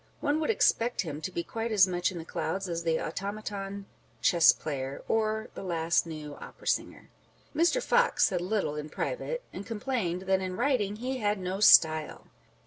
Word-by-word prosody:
One 295 Hz, +1 st, +1 dB
would 315 Hz, -, -1 dB
expect 245 Hz, -, +2 dB
him 155 Hz, -5 st, -6 dB
to 160 Hz, -, -3 dB
be 170 Hz, -, -3 dB
quite 225 Hz, +4 st, -4 dB
as 200 Hz, -3 st, +6 dB
much 180 Hz, -1 st, -1 dB
in 180 Hz, -, -7 dB
the 165 Hz, -, -7 dB
clouds 195 Hz, +3 st, -3 dB
as 170 Hz, -1 st, -3 dB
the 165 Hz, -1 st, 0 dB
automaton 200 Hz, +2 st, -5 dB, 0.3 s
chess 170 Hz, -6 st, +6 dB
player, 135 Hz, -2 st, -5 dB
or 220 Hz, 0 st, 0 dB
the -, -, -7 dB
last 170 Hz, -2 st, 0 dB
new 155 Hz, -2 st, -7 dB
Opera -, -, -12 dB
singer. -, -, -2 dB, 0.5 s
Mr. 345 Hz, +10 st, +2 dB
Fox 485 Hz, 0 st, +3 dB
said 180 Hz, -4 st, 0 dB
little 185 Hz, -5 st, -1 dB
in 150 Hz, 0 st, -5 dB
private, -, -, -3 dB
and 195 Hz, -, -6 dB
complained 210 Hz, -6 st, -2 dB
that 190 Hz, 0 st, +1 dB
in 185 Hz, -1 st, -4 dB
writing 240 Hz, -6 st, +1 dB
he 255 Hz, +4 st, -4 dB
had 210 Hz, -1 st, +1 dB
no 185 Hz, +1 st, -4 dB
style. 155 Hz, -6 st, +5 dB
195 Hz, 180 wpm, -29 LUFS, 170-225 Hz, 0.5 s, as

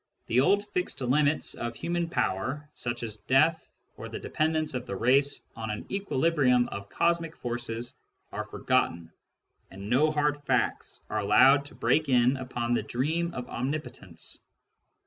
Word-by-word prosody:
The 120 Hz, -, +2 dB
old 200 Hz, +9 st, +3 dB
fixed 180 Hz, -3 st, -2 dB
limits 145 Hz, +4 st, +2 dB
of 120 Hz, 0 st, -5 dB
human 170 Hz, 0 st, -2 dB
power, 140 Hz, -, -1 dB
such 120 Hz, 0 st, -4 dB
as 110 Hz, -2 st, -4 dB
death, 145 Hz, +9 st, +2 dB, 0.3 s
or -, -, -7 dB
the -, -, -5 dB
de -, -, -8 dB
pendence 155 Hz, -1 st, 0 dB
of 125 Hz, -1 st, -4 dB
the 100 Hz, -, -4 dB
race 140 Hz, +6 st, +3 dB
on 110 Hz, -1 st, -5 dB
an 105 Hz, 0 st, -4 dB
equilibrium 145 Hz, -9 st, +2 dB
of 100 Hz, 0 st, -7 dB
cosmic 170 Hz, -1 st, 0 dB
forces, 120 Hz, 0 st, -4 dB, 0.4 s
are -, -, -3 dB
forgotten, 85 Hz, -1 st, -1 dB, 0.6 s
and 100 Hz, +3 st, -8 dB
no 145 Hz, +5 st, +4 dB
hard 150 Hz, -1 st, 0 dB
facts -, -, -1 dB
are 110 Hz, -, 0 dB
allowed 130 Hz, +8 st, +5 dB
to 145 Hz, -, -11 dB
break 155 Hz, -2 st, +1 dB
in 125 Hz, +1 st, +4 dB
upon 120 Hz, -2 st, -2 dB
the -, -, +2 dB
dream 160 Hz, +7 st, -1 dB
of 125 Hz, -, -5 dB
omnipotence. 140 Hz, +5 st, -5 dB
130 Hz, 155 wpm, -28 LUFS, 120-155 Hz, 0.6 s, allowed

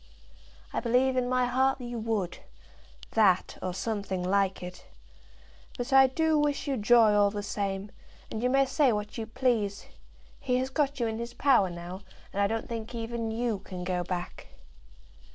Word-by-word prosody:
"I -, -, 0 dB
believe 255 Hz, +2 st, +2 dB
in 250 Hz, -1 st, 0 dB
my 255 Hz, 0 st, +2 dB
heart 265 Hz, +2 st, +2 dB
you 240 Hz, -1 st, -5 dB
would; 215 Hz, -6 st, -2 dB, 0.7 s
that, 195 Hz, -5 st, +3 dB
or 185 Hz, -, -2 dB
something 195 Hz, -1 st, -3 dB
like 195 Hz, 0 st, +1 dB
it. 180 Hz, 0 st, -9 dB, 0.9 s
But 245 Hz, +2 st, -3 dB
I 270 Hz, 0 st, +8 dB
do 315 Hz, +3 st, +1 dB
wish 295 Hz, 0 st, 0 dB
you 275 Hz, -, 0 dB
joy 225 Hz, -1 st, +5 dB
all 205 Hz, -1 st, +4 dB
the 205 Hz, 0 st, -5 dB
same, 200 Hz, 0 st, -3 dB, 0.4 s
and 220 Hz, -, -3 dB
you 250 Hz, -, +2 dB
may 275 Hz, +1 st, +4 dB
say 270 Hz, -1 st, +3 dB
what 210 Hz, +1 st, -3 dB
you 220 Hz, -, -4 dB
please. 225 Hz, -5 st, 0 dB, 0.5 s
He 250 Hz, -1 st, 0 dB
has 260 Hz, +1 st, -2 dB
got 285 Hz, -1 st, 0 dB
you 235 Hz, -, +1 dB
in 220 Hz, 0 st, -2 dB
his 235 Hz, +1 st, -6 dB
power 250 Hz, -9 st, +4 dB
now, 175 Hz, +2 st, -7 dB, 0.3 s
and 200 Hz, -, 0 dB
I 200 Hz, -, +4 dB
don't 225 Hz, +2 st, -3 dB
think 230 Hz, 0 st, -5 dB
even 230 Hz, 0 st, -3 dB
you 225 Hz, -2 st, -1 dB
can 185 Hz, -2 st, -8 dB
go 180 Hz, -1 st, -1 dB
back." 175 Hz, 0 st, -5 dB
225 Hz, 175 wpm, -28 LUFS, 200-255 Hz, 0.9 s, I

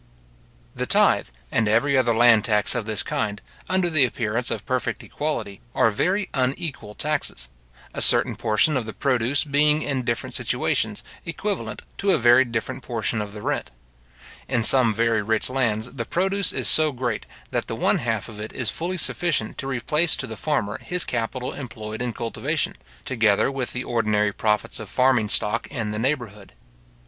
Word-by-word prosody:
The -, -, -3 dB
tythe, -, -, +4 dB, 0.2 s
and 110 Hz, -1 st, +2 dB
every 120 Hz, +7 st, +3 dB
other 120 Hz, -3 st, +3 dB
land 115 Hz, -2 st, +6 dB
tax 105 Hz, -3 st, +4 dB
of 120 Hz, -3 st, -3 dB
this 110 Hz, -2 st, -1 dB
kind, 105 Hz, -1 st, -2 dB, 0.3 s
under 185 Hz, -1 st, +2 dB
the 155 Hz, -4 st, +3 dB
appearance 120 Hz, -1 st, -1 dB
of -, -, -4 dB
perfect 130 Hz, -2 st, -2 dB
equality, 145 Hz, -10 st, -4 dB
are 115 Hz, -, +4 dB
very 190 Hz, -, 0 dB
unequal 130 Hz, -4 st, -2 dB
taxes; 145 Hz, -, -2 dB, 0.4 s
a -, -, -4 dB
certain -, -, +4 dB
portion 115 Hz, +7 st, +2 dB
of 120 Hz, -4 st, -1 dB
the 110 Hz, -, -6 dB
produce 130 Hz, 0 st, +1 dB
being 150 Hz, +1 st, +2 dB
in 135 Hz, -3 st, -1 dB
different 120 Hz, -2 st, -3 dB
situations, -, -, -1 dB, 0.2 s
equivalent 195 Hz, +4 st, -4 dB, 0.2 s
to 200 Hz, -, 0 dB
a -, -, +5 dB
very 120 Hz, +2 st, +6 dB
different 115 Hz, -2 st, -4 dB
portion 115 Hz, -1 st, -2 dB
of 105 Hz, -1 st, -6 dB
the 105 Hz, -1 st, -9 dB
rent. -, -, -2 dB, 0.8 s
In 120 Hz, -3 st, 0 dB
some 125 Hz, -1 st, +7 dB
very 115 Hz, 0 st, +1 dB
rich 110 Hz, +3 st, 0 dB
lands, 120 Hz, -3 st, 0 dB
the 120 Hz, -4 st, -4 dB
produce 195 Hz, -, +1 dB
is -, -, 0 dB
so 155 Hz, -1 st, +4 dB
great, 120 Hz, -4 st, -3 dB, 0.2 s
that -, -, -2 dB
the -, -, -4 dB
one -, -, +1 dB
half -, -, -2 dB
of 110 Hz, -2 st, -10 dB
it 105 Hz, +1 st, -7 dB
is 120 Hz, -6 st, -1 dB
fully 180 Hz, +3 st, -2 dB
sufficient 165 Hz, -10 st, -1 dB
to 135 Hz, -, -4 dB
replace 150 Hz, +6 st, +1 dB
to -, -, -4 dB
the 110 Hz, -, -7 dB
farmer 110 Hz, -7 st, -1 dB
his 180 Hz, 0 st, -1 dB
capital 125 Hz, +3 st, -3 dB
employed 110 Hz, -4 st, -7 dB
in 125 Hz, -1 st, -1 dB
cultivation, 130 Hz, +6 st, -2 dB, 0.3 s
together 115 Hz, -2 st, +2 dB
with 135 Hz, -2 st, -3 dB
the 125 Hz, -, -3 dB
ordinary 105 Hz, -4 st, +1 dB
profits 105 Hz, 0 st, 0 dB
of 110 Hz, -3 st, -8 dB
farming 125 Hz, -4 st, +2 dB
stock 105 Hz, +2 st, +1 dB
in 115 Hz, -6 st, -4 dB
the 105 Hz, -, -3 dB
neighbourhood. 115 Hz, -6 st, -3 dB
120 Hz, 175 wpm, -23 LUFS, 110-140 Hz, 0.8 s, some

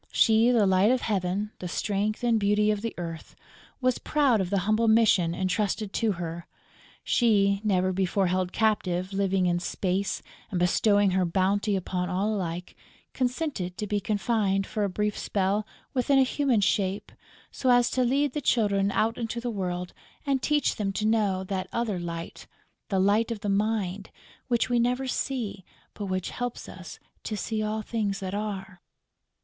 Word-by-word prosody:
She, 225 Hz, +1 st, +4 dB
the 235 Hz, -4 st, +4 dB
Light 190 Hz, +2 st, +4 dB
of 255 Hz, 0 st, +2 dB
Heaven, 200 Hz, 0 st, -1 dB
the 180 Hz, -, -5 dB
strength 205 Hz, +4 st, -1 dB
and 235 Hz, -2 st, +3 dB
beauty 210 Hz, +1 st, +3 dB
of 210 Hz, -1 st, -2 dB
the 230 Hz, 0 st, -4 dB
Earth, 165 Hz, -2 st, -7 dB, 0.5 s
was 255 Hz, -1 st, +1 dB
proud 275 Hz, -8 st, +2 dB
of 180 Hz, -, -2 dB
the 200 Hz, -1 st, +1 dB
humble 215 Hz, +2 st, +2 dB
mission 210 Hz, -7 st, +4 dB
entrusted 200 Hz, +2 st, -1 dB
to 220 Hz, -3 st, +1 dB
her; 170 Hz, -1 st, -6 dB, 0.6 s
she, 200 Hz, -4 st, +3 dB
never 185 Hz, -3 st, +1 dB
before 190 Hz, +1 st, +1 dB
held 185 Hz, 0 st, 0 dB
captive, 190 Hz, -4 st, 0 dB
living 195 Hz, -1 st, +1 dB
in 175 Hz, -1 st, +1 dB
space 190 Hz, +2 st, -2 dB, 0.3 s
and 185 Hz, -4 st, -2 dB
bestowing 200 Hz, +3 st, +3 dB
her 185 Hz, 0 st, +2 dB
bounty 195 Hz, +4 st, +1 dB
upon 180 Hz, -1 st, -2 dB
all 195 Hz, +4 st, 0 dB
alike, 180 Hz, -3 st, -4 dB, 0.4 s
consented 250 Hz, -, -2 dB
to 210 Hz, -, -3 dB
be 205 Hz, 0 st, 0 dB
confined, 200 Hz, -1 st, 0 dB
for 210 Hz, -, -2 dB
a 200 Hz, -, +1 dB
brief 210 Hz, +2 st, -1 dB
spell, 200 Hz, +2 st, -1 dB, 0.3 s
within 270 Hz, +2 st, +2 dB
a 270 Hz, -, +6 dB
human 260 Hz, -4 st, +1 dB
shape, 195 Hz, 0 st, 0 dB, 0.4 s
so 260 Hz, -, -1 dB
as 245 Hz, -1 st, +4 dB
to 255 Hz, -, +1 dB
lead 275 Hz, +2 st, +1 dB
the 295 Hz, -, -2 dB
Children 200 Hz, -6 st, +2 dB
out 225 Hz, +3 st, +1 dB
into 230 Hz, 0 st, -3 dB
the 240 Hz, 0 st, -3 dB
world 180 Hz, -3 st, -3 dB, 0.3 s
and 275 Hz, -2 st, +1 dB
teach 295 Hz, +1 st, +1 dB
them 200 Hz, -2 st, -1 dB
to 210 Hz, -, -2 dB
know 210 Hz, -4 st, +1 dB
that 190 Hz, -1 st, -3 dB
other 225 Hz, -6 st, -1 dB
Light, 170 Hz, -1 st, -6 dB, 0.4 s
the 195 Hz, -, 0 dB
Light 205 Hz, +4 st, +3 dB
of 225 Hz, -3 st, -4 dB
the 205 Hz, -, -2 dB
Mind, 200 Hz, -2 st, -1 dB, 0.4 s
which 240 Hz, -3 st, +1 dB
we 245 Hz, -1 st, +2 dB
never 250 Hz, +3 st, +1 dB
see, 245 Hz, -6 st, -3 dB, 0.3 s
but 205 Hz, -, -5 dB
which 185 Hz, -1 st, -2 dB
helps 245 Hz, -1 st, -4 dB
us -, -, -10 dB, 0.2 s
to 215 Hz, -, -4 dB
see 220 Hz, +1 st, -2 dB
all 215 Hz, 0 st, -2 dB
things 210 Hz, -3 st, -2 dB
that 190 Hz, -1 st, -5 dB
are. 195 Hz, -3 st, -5 dB
205 Hz, 175 wpm, -27 LUFS, 185-225 Hz, 0.6 s, a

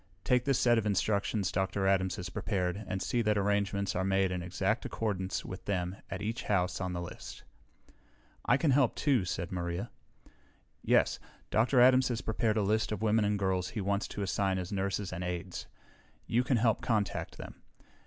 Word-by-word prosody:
Take 125 Hz, -1 st, +2 dB
this 135 Hz, -3 st, +2 dB
set 120 Hz, -2 st, +4 dB
of 110 Hz, -, -2 dB
instructions 100 Hz, -1 st, 0 dB
Dr. 95 Hz, +1 st, -1 dB
Adams 95 Hz, -1 st, +2 dB
has 90 Hz, -1 st, -6 dB
prepared 95 Hz, +1 st, -2 dB
and 95 Hz, -, -2 dB
see 120 Hz, -, 0 dB
that 105 Hz, -2 st, +2 dB
arrangements 100 Hz, -1 st, 0 dB
are 95 Hz, -, 0 dB
made 95 Hz, 0 st, +2 dB
in 90 Hz, -1 st, -2 dB
exact 95 Hz, +6 st, -1 dB
accordance 95 Hz, -4 st, -2 dB
with 95 Hz, -, -8 dB
them 90 Hz, -2 st, -1 dB
at 95 Hz, +1 st, -5 dB
each 110 Hz, +2 st, -2 dB
house 90 Hz, -2 st, 0 dB
on 90 Hz, -1 st, -2 dB
the 85 Hz, -, -3 dB
list." 85 Hz, -, -9 dB, 1.0 s
"I -, -, +4 dB
can 150 Hz, -1 st, +2 dB
help, 130 Hz, -3 st, +3 dB
too," 130 Hz, -10 st, +2 dB
said 90 Hz, +1 st, -3 dB
Maria. 85 Hz, +3 st, -3 dB, 0.9 s
"Yes. -, -, +3 dB, 0.3 s
Dr. 120 Hz, +4 st, +3 dB
Adams 130 Hz, +1 st, +6 dB
has 120 Hz, -2 st, -2 dB
prepared 110 Hz, 0 st, 0 dB
a 105 Hz, -, +2 dB
list 110 Hz, +3 st, +1 dB
of 105 Hz, 0 st, -3 dB
women 110 Hz, 0 st, +3 dB
and 105 Hz, 0 st, +1 dB
girls 95 Hz, -2 st, 0 dB
he 115 Hz, -, -5 dB
wants 100 Hz, +1 st, 0 dB
to 105 Hz, -, -4 dB
assign 95 Hz, 0 st, 0 dB
as 90 Hz, +1 st, -4 dB
nurses 100 Hz, -1 st, -2 dB
and 90 Hz, 0 st, -4 dB
aides. 90 Hz, 0 st, -4 dB, 0.6 s
You 120 Hz, +2 st, +1 dB
can 125 Hz, -1 st, +2 dB
help 115 Hz, -1 st, +2 dB
contact 105 Hz, -5 st, -1 dB
them. -, -, -10 dB
100 Hz, 185 wpm, -31 LUFS, 95-110 Hz, 1.0 s, Adams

